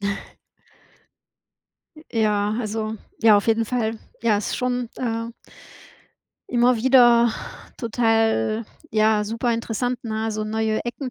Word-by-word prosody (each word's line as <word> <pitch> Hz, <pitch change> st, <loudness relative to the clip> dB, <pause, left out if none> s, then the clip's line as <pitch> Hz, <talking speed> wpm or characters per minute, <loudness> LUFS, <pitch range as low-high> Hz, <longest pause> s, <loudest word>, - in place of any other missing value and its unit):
Ja, 200 Hz, 0 st, -1 dB
ist -, -, -6 dB
schon, -, -, -15 dB
äh -, -, -25 dB, 1.8 s
Ja, 210 Hz, -2 st, +1 dB
also 220 Hz, -1 st, -3 dB, 0.3 s
ja, 220 Hz, -2 st, +7 dB
auf 205 Hz, -, 0 dB
jeden 225 Hz, 0 st, +2 dB
Fall. 225 Hz, -1 st, -2 dB, 0.2 s
Ja, 225 Hz, -3 st, +3 dB
ist 205 Hz, -, -2 dB
schon, 250 Hz, -1 st, -1 dB
äh 230 Hz, -2 st, -3 dB, 1.2 s
immer 245 Hz, 0 st, +3 dB
wieder 240 Hz, -1 st, +5 dB, 0.4 s
total, 225 Hz, -, +1 dB, 0.3 s
ja, 215 Hz, -1 st, +2 dB
super 230 Hz, +3 st, -1 dB
interessant, 235 Hz, +2 st, -2 dB
ne, 220 Hz, 0 st, -2 dB
so 215 Hz, 0 st, -3 dB
neue 220 Hz, 0 st, -1 dB
Ecken 245 Hz, +2 st, -5 dB
225 Hz, 130 wpm, -23 LUFS, 215-240 Hz, 1.8 s, ja